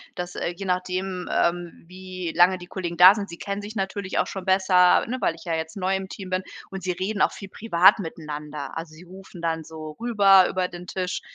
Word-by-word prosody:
dass, 180 Hz, 0 st, -6 dB
äh, -, -, -2 dB
je 195 Hz, +3 st, -8 dB
nachdem, 185 Hz, 0 st, -2 dB
ähm, 170 Hz, -1 st, -1 dB
wie 185 Hz, -2 st, -7 dB
lange 180 Hz, +2 st, +5 dB
die 175 Hz, -, -11 dB
Kollegen 175 Hz, -2 st, -5 dB
da 185 Hz, +3 st, +9 dB
sind, 200 Hz, -2 st, -5 dB
sie 170 Hz, -, -9 dB
kennen 200 Hz, 0 st, -4 dB
sich 210 Hz, +2 st, -9 dB
natürlich 195 Hz, 0 st, -3 dB
auch -, -, +1 dB
schon 195 Hz, -, -6 dB
besser, 185 Hz, -1 st, +4 dB
ne, 250 Hz, +3 st, -3 dB
weil 165 Hz, -, +1 dB
ich 165 Hz, -, -15 dB
ja 165 Hz, -2 st, -1 dB
jetzt 160 Hz, +3 st, -5 dB
neu 190 Hz, 0 st, 0 dB
im 190 Hz, 0 st, -5 dB
Team 190 Hz, -2 st, -8 dB
bin 185 Hz, 0 st, -1 dB, 0.3 s
und 195 Hz, -1 st, -7 dB
sie 185 Hz, -, -1 dB
reden 190 Hz, +3 st, -3 dB
auch -, -, +4 dB
viel 195 Hz, -, -9 dB
privat 190 Hz, -1 st, +4 dB
miteinander. 150 Hz, -4 st, -7 dB
Also, 165 Hz, -1 st, -7 dB
sie 165 Hz, -, -14 dB
rufen 185 Hz, -1 st, -13 dB
dann 165 Hz, -1 st, -2 dB
so 155 Hz, 0 st, -9 dB
rüber 200 Hz, -5 st, +5 dB
über 185 Hz, -1 st, -1 dB
den 180 Hz, 0 st, -10 dB
Tisch, 185 Hz, -1 st, -3 dB
185 Hz, 225 wpm, -24 LUFS, 170-195 Hz, 0.3 s, da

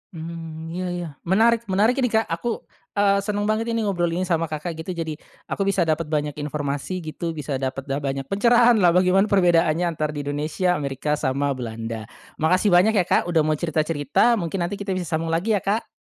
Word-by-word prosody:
Mmm, 165 Hz, 0 st, -7 dB
iya 185 Hz, +2 st, -3 dB
iya, 175 Hz, -1 st, -4 dB, 0.2 s
menarik. 230 Hz, +5 st, +3 dB
Menarik 215 Hz, +7 st, +2 dB
ini 250 Hz, -, +3 dB
Kak 220 Hz, -1 st, +2 dB
aku, 195 Hz, +8 st, -2 dB, 0.3 s
eee, 200 Hz, -1 st, +3 dB
seneng 205 Hz, +1 st, -2 dB
banget 215 Hz, +2 st, 0 dB
ini 225 Hz, -, 0 dB
ngobrol 180 Hz, -4 st, 0 dB
ini 185 Hz, -, 0 dB
sama 165 Hz, -2 st, 0 dB
Kakak 155 Hz, +3 st, -4 dB
gitu 175 Hz, +3 st, -5 dB
jadi 160 Hz, -2 st, -4 dB, 0.3 s
aku 195 Hz, -, -1 dB
bisa 195 Hz, -2 st, +2 dB
dapet 160 Hz, 0 st, 0 dB
banyak 150 Hz, -1 st, -1 dB
informasi 145 Hz, +4 st, -3 dB
gitu 160 Hz, +1 st, -4 dB
bisa 145 Hz, -3 st, -3 dB
dapet 135 Hz, 0 st, -3 dB
dah 135 Hz, +1 st, -2 dB
banyak 135 Hz, -1 st, -3 dB
pencerahan 235 Hz, -, +4 dB
lah 175 Hz, -3 st, +4 dB
bagaimana 185 Hz, +2 st, +4 dB
perbedaannya 175 Hz, -4 st, +3 dB
antara 155 Hz, -3 st, -2 dB
di 145 Hz, -, -3 dB
Indonesia, 150 Hz, +5 st, -1 dB
Amerika, 145 Hz, +1 st, -2 dB
sama 140 Hz, +1 st, 0 dB
Belanda. 115 Hz, -3 st, -5 dB, 0.3 s
Makasih 185 Hz, +6 st, +3 dB
banyak 185 Hz, +6 st, +5 dB
ya 190 Hz, -, +4 dB
Kak 170 Hz, -, +1 dB
udah 170 Hz, -2 st, +3 dB
mau 155 Hz, 0 st, +1 dB
cerita-cerita 160 Hz, -, +1 dB
mungkin 175 Hz, +1 st, -2 dB
nanti 190 Hz, +4 st, -3 dB
kita 195 Hz, -2 st, -2 dB
bisa 185 Hz, -, -2 dB
sambung 165 Hz, -1 st, -2 dB
lagi 170 Hz, +7 st, 0 dB
ya 205 Hz, -, +3 dB
Kak. 200 Hz, +5 st, -1 dB
170 Hz, 200 wpm, -23 LUFS, 150-195 Hz, 0.3 s, banyak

